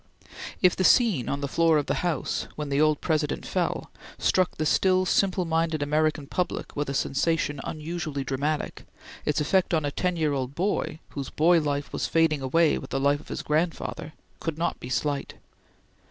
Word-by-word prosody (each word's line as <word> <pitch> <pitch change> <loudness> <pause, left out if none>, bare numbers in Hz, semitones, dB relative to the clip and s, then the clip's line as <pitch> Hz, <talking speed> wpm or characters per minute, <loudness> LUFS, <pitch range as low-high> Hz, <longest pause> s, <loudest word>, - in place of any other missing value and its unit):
If 180 - +5
the 185 - 0
scene 195 - +4
on 140 - -2
the 140 - -1
floor 165 +2 +3
of 145 - 0
the - - 0
House, 175 -5 -1
when 150 -1 -4
the 140 +1 +2
old 155 -1 +3
President 155 -3 -1
fell, - - -2 0.3
struck 185 -2 +1
the 155 - -1
still 185 +3 +3
simple 185 -1 +2
minded 160 -2 0
American 155 0 +1
public 180 +5 -3
with 145 -1 -2
a 140 - -2
sensation 145 0 0
unusually 155 -2 -4
dramatic, 145 +3 -2 0.4
its 150 - +1
effect 175 +3 +2
on 155 -2 0
a 145 - -1
ten 180 +4 -1
year 155 -3 +1
old 135 0 -3
boy, 185 -2 -1
whose 140 -2 -5
boy 170 +2 +4
life 145 -1 -2
was - - -1
fading 160 -3 +2
away 160 +4 +3
with - - -9
the 135 - -1
life 140 +1 +2
of - - -16
his - - -4
grandfather, 160 0 -2 0.3
could 165 -2 -3
not 170 +1 -1
be 125 - -8
slight. 140 +3 -2
155 Hz, 185 wpm, -26 LUFS, 145-170 Hz, 0.4 s, If